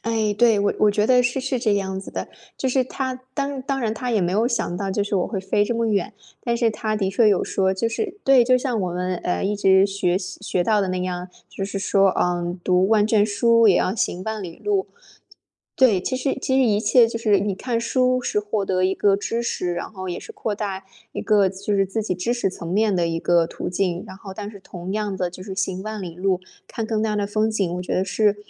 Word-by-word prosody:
哎， 220 Hz, -2 st, 0 dB
对， 225 Hz, -2 st, +4 dB
我 200 Hz, 0 st, +1 dB
我 210 Hz, -, +5 dB
觉 210 Hz, +1 st, +1 dB
得 250 Hz, 0 st, +5 dB
是 245 Hz, +2 st, 0 dB
是 260 Hz, -1 st, -2 dB
这 215 Hz, -4 st, +2 dB
样 190 Hz, -1 st, -2 dB
子 195 Hz, -, -10 dB
的， -, -, -4 dB, 0.3 s
就 265 Hz, -, 0 dB
是 260 Hz, 0 st, +2 dB
他 260 Hz, 0 st, -4 dB
当 280 Hz, -1 st, -2 dB
当 270 Hz, +1 st, -2 dB
然 225 Hz, -4 st, -1 dB
他 250 Hz, +2 st, -3 dB
也 220 Hz, -, +2 dB
没 175 Hz, 0 st, 0 dB
有 220 Hz, +5 st, +2 dB
想 225 Hz, -8 st, -1 dB
到 195 Hz, +1 st, -3 dB
就 200 Hz, +1 st, 0 dB
是 205 Hz, -, -3 dB
我 180 Hz, -, +1 dB
会 200 Hz, -, -3 dB
飞 195 Hz, +2 st, +1 dB
这 235 Hz, -, -2 dB
么 230 Hz, 0 st, +1 dB
远。 205 Hz, -4 st, 0 dB, 0.3 s
但 235 Hz, -1 st, 0 dB
是 235 Hz, -1 st, +2 dB
他 215 Hz, 0 st, -2 dB
的 195 Hz, -2 st, 0 dB
确 215 Hz, +3 st, +4 dB
有 200 Hz, -3 st, +2 dB
说， 190 Hz, -1 st, +1 dB
就 190 Hz, +4 st, -1 dB
是 395 Hz, -, -4 dB
对， 270 Hz, -2 st, +6 dB
就 255 Hz, +1 st, +4 dB
像 250 Hz, -4 st, -1 dB
我 180 Hz, -2 st, -1 dB
们， 180 Hz, +1 st, -2 dB
呃， 180 Hz, -, -2 dB
一 205 Hz, +2 st, 0 dB
直 195 Hz, -1 st, +4 dB
学 190 Hz, -2 st, 0 dB
习 190 Hz, -1 st, -8 dB
学 185 Hz, -3 st, 0 dB
到 215 Hz, +1 st, +3 dB
的 195 Hz, -, -1 dB
那 185 Hz, 0 st, -1 dB
样， 180 Hz, 0 st, -4 dB, 0.2 s
就 195 Hz, -, -5 dB
是 195 Hz, 0 st, -4 dB
说， 195 Hz, 0 st, +3 dB
嗯， 175 Hz, 0 st, -1 dB
读 185 Hz, +1 st, +3 dB
万 210 Hz, -1 st, +4 dB
卷 215 Hz, -2 st, +3 dB
书 230 Hz, +2 st, +4 dB
也 185 Hz, -, +5 dB
要 185 Hz, -, +1 dB
行 185 Hz, -4 st, -2 dB
万 220 Hz, -1 st, -3 dB
里 170 Hz, -3 st, -8 dB
路。 405 Hz, -2 st, 0 dB, 0.9 s
对， 230 Hz, -8 st, +4 dB
其 255 Hz, -, -2 dB
实 270 Hz, +1 st, -1 dB
其 260 Hz, -, 0 dB
实 265 Hz, -, +5 dB
一 210 Hz, -3 st, +2 dB
切 240 Hz, +1 st, +5 dB
就 230 Hz, -, -4 dB
是， 215 Hz, -3 st, +3 dB
你 200 Hz, +1 st, -1 dB
看 230 Hz, +4 st, -2 dB
书 255 Hz, +2 st, +1 dB
是 210 Hz, -, -1 dB
获 210 Hz, -1 st, -2 dB
得 185 Hz, -1 st, 0 dB
一 190 Hz, +1 st, +2 dB
个 200 Hz, 0 st, +3 dB
知 230 Hz, +3 st, -2 dB
识， 180 Hz, -6 st, -2 dB
然 175 Hz, -, -4 dB
后 185 Hz, -3 st, -7 dB
也 175 Hz, -, -3 dB
是 450 Hz, -, -10 dB
扩 400 Hz, -, -3 dB
大 195 Hz, -2 st, -4 dB, 0.3 s
一 -, -, -4 dB
个 205 Hz, -3 st, +4 dB
就 195 Hz, +2 st, -3 dB
是 195 Hz, 0 st, +2 dB
自 220 Hz, +4 st, -2 dB
己 205 Hz, -, -2 dB
知 185 Hz, +7 st, -1 dB
识 240 Hz, -6 st, 0 dB
层 170 Hz, -2 st, -8 dB
面 210 Hz, +1 st, +2 dB
的 175 Hz, -2 st, +1 dB
一 165 Hz, 0 st, -2 dB
个 170 Hz, -1 st, +3 dB
途 -, -, -5 dB
径。 180 Hz, -1 st, -1 dB
然 190 Hz, -, -10 dB
后 195 Hz, -1 st, -10 dB
但 205 Hz, +1 st, -6 dB
是 205 Hz, -, -12 dB
同 180 Hz, 0 st, -7 dB
样 210 Hz, -2 st, -2 dB
的 180 Hz, -1 st, -1 dB
就 180 Hz, +1 st, -10 dB
是 190 Hz, -1 st, -6 dB
行 190 Hz, -1 st, -2 dB
万 215 Hz, -1 st, -5 dB
里 170 Hz, -2 st, -7 dB
路， 185 Hz, 0 st, 0 dB, 0.3 s
看 225 Hz, -, -4 dB
更 220 Hz, -1 st, -1 dB
大 220 Hz, -1 st, 0 dB
的 205 Hz, -, 0 dB
风 215 Hz, +2 st, +1 dB
景， 195 Hz, -5 st, -1 dB
我 180 Hz, -, -4 dB
觉 -, -, -3 dB
得 185 Hz, -, +1 dB
是 205 Hz, +1 st, +2 dB
205 Hz, 280 characters per minute, -22 LUFS, 190-230 Hz, 0.9 s, 对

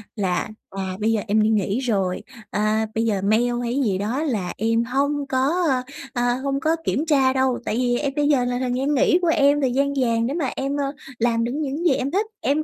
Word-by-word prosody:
là, 195 Hz, -2 st, -1 dB, 0.2 s
à, 195 Hz, 0 st, -5 dB, 0.2 s
"Bây 220 Hz, +2 st, +1 dB
giờ 220 Hz, -, +1 dB
em 215 Hz, +1 st, +3 dB
đi 215 Hz, -, +3 dB
nghỉ 210 Hz, +1 st, +1 dB
rồi, 195 Hz, -8 st, -1 dB, 0.3 s
à, 215 Hz, +1 st, +1 dB
bây 225 Hz, +1 st, +1 dB
giờ 205 Hz, -4 st, 0 dB
mail 220 Hz, +5 st, +2 dB
hay 240 Hz, +1 st, -2 dB
gì 195 Hz, -3 st, +1 dB
đó 230 Hz, +10 st, -1 dB
là 215 Hz, -, -2 dB
em 230 Hz, +2 st, +1 dB
hông 280 Hz, +3 st, -1 dB
có, 265 Hz, +4 st, +1 dB, 0.6 s
a, 245 Hz, -1 st, +1 dB
hông 275 Hz, 0 st, 0 dB
có 315 Hz, +3 st, +1 dB
kiểm 300 Hz, -, 0 dB
tra 270 Hz, -5 st, +3 dB
đâu, 260 Hz, -2 st, +1 dB
tại 210 Hz, -, -1 dB
vì 245 Hz, -1 st, +1 dB
em 280 Hz, 0 st, -2 dB
bây 290 Hz, -1 st, +2 dB
giờ 275 Hz, -4 st, +3 dB
là 245 Hz, 0 st, -1 dB
thời 255 Hz, -1 st, -1 dB
gian 275 Hz, +3 st, 0 dB
nghỉ 345 Hz, +6 st, +4 dB
của 350 Hz, -, +1 dB
em, 290 Hz, -2 st, +3 dB
thời 260 Hz, -, +1 dB
gian 280 Hz, +2 st, +1 dB
vàng 230 Hz, -2 st, +1 dB
để 270 Hz, -, -2 dB
mà 295 Hz, -6 st, -1 dB
em, 275 Hz, +1 st, -2 dB
ờ, 280 Hz, -1 st, -1 dB, 0.3 s
làm 230 Hz, 0 st, +2 dB
được 235 Hz, -, -1 dB
những 300 Hz, +3 st, -3 dB
gì 320 Hz, -, +5 dB
em 265 Hz, +2 st, -2 dB
thích, 405 Hz, +3 st, +1 dB, 0.2 s
em 290 Hz, +3 st, +1 dB
250 Hz, 240 wpm, -22 LUFS, 225-280 Hz, 0.6 s, gì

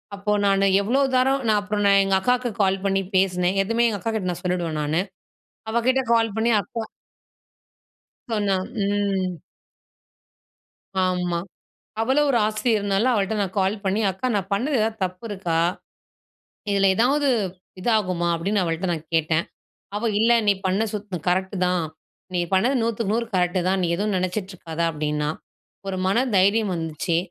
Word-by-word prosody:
அப்போ 200 Hz, +1 st, -2 dB
நானு 195 Hz, 0 st, +3 dB, 0.2 s
எவ்ளோ 240 Hz, +7 st, +1 dB
தரம் 265 Hz, +2 st, +3 dB
நான் 215 Hz, -1 st, +4 dB
அப்பறம் 205 Hz, 0 st, -1 dB
நான் 200 Hz, 0 st, +6 dB
எங்க 195 Hz, 0 st, +1 dB
அக்காக்கு 250 Hz, +3 st, +1 dB
கால் 195 Hz, 0 st, +1 dB
பண்ணி 195 Hz, 0 st, +2 dB
பேசுனேன். 185 Hz, 0 st, +2 dB
எதுமே 230 Hz, +4 st, +1 dB
எங்க 205 Hz, -2 st, -3 dB
அக்காகிட்ட 215 Hz, -1 st, -2 dB
நான் 175 Hz, -, -6 dB
சொல்லிடுவேன் 175 Hz, -4 st, -1 dB
நானு. 155 Hz, +4 st, 0 dB, 0.7 s
அவக்கிட்ட 245 Hz, +4 st, +2 dB
கால் 225 Hz, -2 st, +2 dB
பண்ணி, 225 Hz, +1 st, +1 dB
அக்கா 225 Hz, +4 st, -6 dB, 1.5 s
சொன்னா, 205 Hz, -3 st, +1 dB, 0.3 s
ம். 200 Hz, -2 st, 0 dB, 1.7 s
ஆமா. 180 Hz, -2 st, 0 dB, 0.6 s
அவளும் 270 Hz, +6 st, +2 dB
ஒரு 255 Hz, -, +3 dB
ஆசிரியர்னால 215 Hz, -1 st, +1 dB
அவள்ட்ட 205 Hz, -1 st, 0 dB
நான் 190 Hz, -2 st, -3 dB
கால் 190 Hz, +2 st, +1 dB
பண்ணி, 195 Hz, +3 st, +1 dB
"அக்கா! 190 Hz, +8 st, -3 dB
நான் 195 Hz, -1 st, -2 dB
பண்ணது 265 Hz, +8 st, 0 dB
எதாவது 220 Hz, +1 st, 0 dB
தப்பு 185 Hz, +1 st, -4 dB
இருக்கா? 185 Hz, -5 st, -2 dB, 1.1 s
இதுல 195 Hz, -1 st, +3 dB
எதாவது 280 Hz, +6 st, +2 dB, 0.5 s
இதாகுமா?", 185 Hz, -5 st, +1 dB
அப்டின்னு 195 Hz, +5 st, 0 dB
அவள்ட்ட 165 Hz, +2 st, -2 dB
நான் 160 Hz, -1 st, -6 dB
கேட்டேன். 160 Hz, +1 st, +1 dB, 0.5 s
அவ, 230 Hz, +2 st, 0 dB
"இல்ல, 230 Hz, +2 st, +4 dB, 0.2 s
நீ 205 Hz, -, +6 dB
பண்ண 190 Hz, +3 st, +1 dB
சுத் 205 Hz, -2 st, -5 dB
கரெக்ட்டு 190 Hz, +2 st, 0 dB
தான். 180 Hz, -2 st, +1 dB, 0.5 s
நீ 180 Hz, -, +1 dB
பண்ணது 235 Hz, +9 st, +3 dB
நூத்துக்கு 225 Hz, -2 st, -1 dB
நூறு 235 Hz, +1 st, 0 dB
கரெக்ட்டு 180 Hz, 0 st, +1 dB
தான். 190 Hz, 0 st, +1 dB
நீ -, -, +1 dB
எதுவும் 205 Hz, +3 st, -1 dB
நெனச்சிட்ருக்காத", 185 Hz, -3 st, -4 dB
அப்டின்னா. 150 Hz, -1 st, -2 dB, 0.6 s
ஒரு 190 Hz, -1 st, -2 dB
மன 195 Hz, -, +2 dB, 0.2 s
தைரியம் 200 Hz, +1 st, +3 dB
வந்துச்சு. 165 Hz, +1 st, -2 dB
195 Hz, 145 wpm, -23 LUFS, 180-220 Hz, 1.7 s, நான்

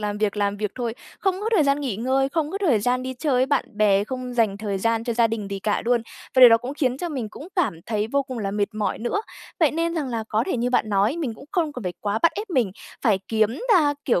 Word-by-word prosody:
làm 210 Hz, -1 st, -2 dB
việc, 210 Hz, 0 st, 0 dB
làm 205 Hz, 0 st, 0 dB
việc 210 Hz, -1 st, -3 dB
thôi. 235 Hz, -3 st, -3 dB, 0.3 s
Không 385 Hz, -1 st, 0 dB
có 435 Hz, -, -1 dB
thời 330 Hz, -8 st, +4 dB
gian 280 Hz, +1 st, +2 dB
nghỉ 260 Hz, -9 st, -2 dB
ngơi, 260 Hz, +4 st, +1 dB
không 305 Hz, +1 st, -1 dB
có 395 Hz, -, -3 dB
thời 305 Hz, -, +2 dB
gian 250 Hz, +4 st, +1 dB
đi 260 Hz, 0 st, -4 dB
chơi 285 Hz, +3 st, -1 dB
với 255 Hz, +1 st, +3 dB
bạn 285 Hz, -1 st, +1 dB
bè, 205 Hz, -2 st, +3 dB
không 255 Hz, +1 st, -5 dB
dành 220 Hz, -5 st, +2 dB
thời 200 Hz, -2 st, -2 dB
gian 230 Hz, +2 st, 0 dB
cho 235 Hz, -, -1 dB
gia 235 Hz, 0 st, +4 dB
đình 220 Hz, -3 st, -4 dB
gì 200 Hz, -, -3 dB
cả 210 Hz, +1 st, -1 dB
luôn, 240 Hz, 0 st, +2 dB, 0.3 s
và 260 Hz, -, +4 dB
điều 250 Hz, -, +12 dB
đó 230 Hz, -, +7 dB
cũng 250 Hz, +4 st, -6 dB
khiến 260 Hz, -3 st, 0 dB
cho 350 Hz, -, -3 dB
mình 260 Hz, -8 st, -4 dB
cũng 290 Hz, -, -10 dB
cảm 220 Hz, -, 0 dB
thấy 215 Hz, -1 st, -1 dB
vô 280 Hz, +5 st, +1 dB
cùng 255 Hz, -2 st, -7 dB
là 200 Hz, -3 st, -2 dB
mệt 205 Hz, +1 st, -1 dB
mỏi 215 Hz, -1 st, -1 dB
nữa. 240 Hz, -, -1 dB, 0.4 s
Vậy 310 Hz, -, +5 dB
nên 335 Hz, +2 st, -1 dB
rằng 300 Hz, -5 st, -2 dB
là 230 Hz, -3 st, -3 dB
có 220 Hz, 0 st, +1 dB
thể -, -, -1 dB
như 245 Hz, +1 st, 0 dB
bạn 245 Hz, -3 st, +2 dB
nói, 205 Hz, +7 st, +2 dB
mình 285 Hz, -9 st, -3 dB
cũng 220 Hz, -, -13 dB
không 330 Hz, -6 st, 0 dB
cần 250 Hz, -, -7 dB
phải 180 Hz, -2 st, -3 dB
quá 205 Hz, +1 st, -1 dB
bắt 335 Hz, -, +5 dB
ép 415 Hz, 0 st, -6 dB
mình 250 Hz, -, +2 dB, 0.3 s
phải 215 Hz, -6 st, +3 dB
kiếm 220 Hz, -1 st, +2 dB, 0.2 s
ra, 295 Hz, -5 st, +4 dB
kiểu, 235 Hz, -9 st, +2 dB
245 Hz, 285 wpm, -23 LUFS, 215-280 Hz, 0.4 s, điều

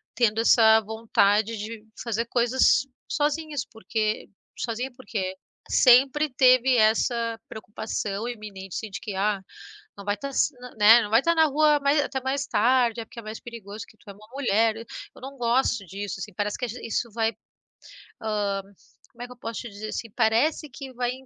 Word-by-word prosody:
tendo 225 Hz, -3 st, +2 dB
essa 220 Hz, -1 st, +6 dB
vontade 220 Hz, 0 st, +1 dB
de 215 Hz, +1 st, -7 dB, 0.2 s
fazer 230 Hz, -1 st, -1 dB
coisas 245 Hz, +3 st, +3 dB, 0.2 s
sozinhas. 295 Hz, -2 st, -1 dB
Por 225 Hz, -, -17 dB
que, 215 Hz, -1 st, -1 dB, 0.3 s
sozinha 245 Hz, +3 st, -3 dB
por 255 Hz, +1 st, -16 dB
quê? 190 Hz, -4 st, -3 dB, 0.4 s
Sempre 275 Hz, +4 st, +5 dB
teve 255 Hz, 0 st, +5 dB
essa 230 Hz, +1 st, +2 dB
preocupação 215 Hz, 0 st, -4 dB
iminente 200 Hz, -5 st, -8 dB
assim 220 Hz, -, -4 dB
de 190 Hz, -, -5 dB
que: 205 Hz, -, -5 dB
"Ah, 200 Hz, +1 st, 0 dB, 0.6 s
não 200 Hz, -, -10 dB
vai 205 Hz, 0 st, 0 dB
estar 275 Hz, +7 st, -6 dB, 0.5 s
né, 220 Hz, +3 st, +8 dB
não 205 Hz, -, -5 dB
vai 225 Hz, -, +5 dB
estar 335 Hz, +2 st, +2 dB
na 320 Hz, -, +5 dB
rua 300 Hz, 0 st, +3 dB
mais 280 Hz, +2 st, +3 dB
até 270 Hz, -2 st, -3 dB
mais 275 Hz, +2 st, -1 dB
tarde, 240 Hz, 0 st, +2 dB
é -, -, -8 dB
porque 235 Hz, -, -11 dB
é 230 Hz, -, -9 dB
mais 215 Hz, +1 st, -6 dB
perigoso 220 Hz, -3 st, -9 dB
que 215 Hz, -, -21 dB
tu 200 Hz, -, -17 dB
é -, -, -8 dB
uma 210 Hz, +2 st, -17 dB
mulher." 225 Hz, -5 st, +2 dB, 0.4 s
Eu -, -, -15 dB
não 275 Hz, +1 st, -8 dB
gosto 235 Hz, -2 st, +1 dB
disso, 200 Hz, +2 st, -6 dB
assim, 200 Hz, +1 st, -7 dB
parece 205 Hz, 0 st, -2 dB
que 250 Hz, -, -2 dB
age 240 Hz, +1 st, -6 dB
isso 230 Hz, +1 st, -2 dB
vai, 225 Hz, 0 st, +1 dB, 0.9 s
hã, 205 Hz, -2 st, -1 dB, 0.5 s
como 240 Hz, 0 st, -10 dB
é -, -, -4 dB
que -, -, -15 dB
eu -, -, -25 dB
posso 230 Hz, -1 st, -5 dB
te 240 Hz, -, -8 dB
dizer 205 Hz, +1 st, -7 dB
assim? 230 Hz, +1 st, -5 dB
Parece 240 Hz, +8 st, +1 dB
que 265 Hz, +1 st, -9 dB
vai 245 Hz, 0 st, -1 dB
230 Hz, 185 wpm, -25 LUFS, 210-255 Hz, 0.9 s, né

